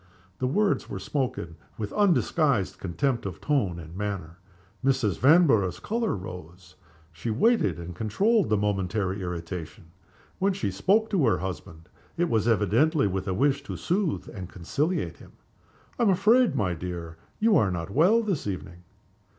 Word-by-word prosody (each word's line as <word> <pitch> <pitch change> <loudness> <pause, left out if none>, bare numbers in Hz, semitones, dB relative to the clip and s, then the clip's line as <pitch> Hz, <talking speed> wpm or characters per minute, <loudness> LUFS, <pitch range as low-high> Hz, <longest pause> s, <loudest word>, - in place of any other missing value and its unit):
The 130 - 0
words 200 +9 +1
were 100 - -4
spoken 105 - -3 0.2
with 105 -2 -4
undisguised 160 - +2
contempt 115 +8 -1
of 90 -4 -7
tone 125 - 0
and 80 0 -10
manner. 95 -4 -4 0.4
Mrs. 130 -7 +1
Vanborough's 135 - +4
color 225 0 -1
rose. 90 -1 -10 0.4
She 80 +8 -5
waited, 220 - +2
and 85 0 -7
controlled 195 - +1
the 105 - +3
momentary 100 -1 -1
irritation. 85 -2 -6 0.5
When 195 +1 +2
she 185 - -2
spoke 205 - +2
to 170 - +3
her 110 - +3
husband 90 -3 -7 0.3
it 175 0 +1
was 110 -1 +2
evidently 115 - +3
with 95 0 -2
a 95 - -1
wish 140 +4 +2
to 140 - -7
soothe 180 -2 -1
and 95 -5 -7
conciliate 145 - -2
him. - - -16 0.7
"I - - 0
am 230 - +4
afraid, 215 - +4
my 95 -8 0
dear, 85 -1 -6 0.2
you 220 -1 +4
are 105 - +4
not 85 0 -4
well 190 - +4
this 190 - -2
evening?" 90 -2 -6
105 Hz, 155 wpm, -26 LUFS, -, 0.7 s, Vanborough's